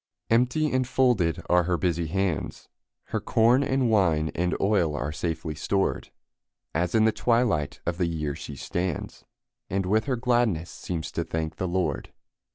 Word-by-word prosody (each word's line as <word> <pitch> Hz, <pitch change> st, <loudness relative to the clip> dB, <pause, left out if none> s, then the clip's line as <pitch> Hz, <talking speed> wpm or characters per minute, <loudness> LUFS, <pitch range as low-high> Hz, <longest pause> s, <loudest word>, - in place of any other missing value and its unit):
Empty 125 Hz, +7 st, +2 dB
and 130 Hz, -1 st, +1 dB
folded 120 Hz, -12 st, +2 dB
are 90 Hz, -1 st, +3 dB
her 90 Hz, 0 st, +1 dB
busy 85 Hz, -2 st, 0 dB
hands; 95 Hz, -1 st, -2 dB, 0.4 s
Her -, -, -1 dB
corn 120 Hz, +4 st, +3 dB
and 135 Hz, -2 st, +1 dB
wine 85 Hz, -8 st, +2 dB
and 90 Hz, +1 st, 0 dB
oil 95 Hz, -7 st, +2 dB
are 75 Hz, +2 st, -2 dB
safely 80 Hz, 0 st, -3 dB
stored, 95 Hz, +6 st, -1 dB, 0.6 s
As 85 Hz, +4 st, 0 dB
in 110 Hz, -1 st, +5 dB
the 110 Hz, -, +4 dB
twilight 115 Hz, -, +1 dB
of 85 Hz, +1 st, -2 dB
the 90 Hz, -, +2 dB
year 75 Hz, -3 st, -2 dB
she 70 Hz, -, -8 dB
stands, 85 Hz, +4 st, -4 dB, 0.4 s
And 95 Hz, 0 st, -1 dB
with 110 Hz, +4 st, +2 dB
her 135 Hz, -2 st, 0 dB
gladness 120 Hz, -9 st, +1 dB
seems 85 Hz, -3 st, -5 dB
to -, -, -2 dB
thank 80 Hz, -1 st, -4 dB
the 95 Hz, -, -2 dB
Lord. 90 Hz, 0 st, -1 dB
90 Hz, 165 wpm, -26 LUFS, 80-115 Hz, 0.6 s, in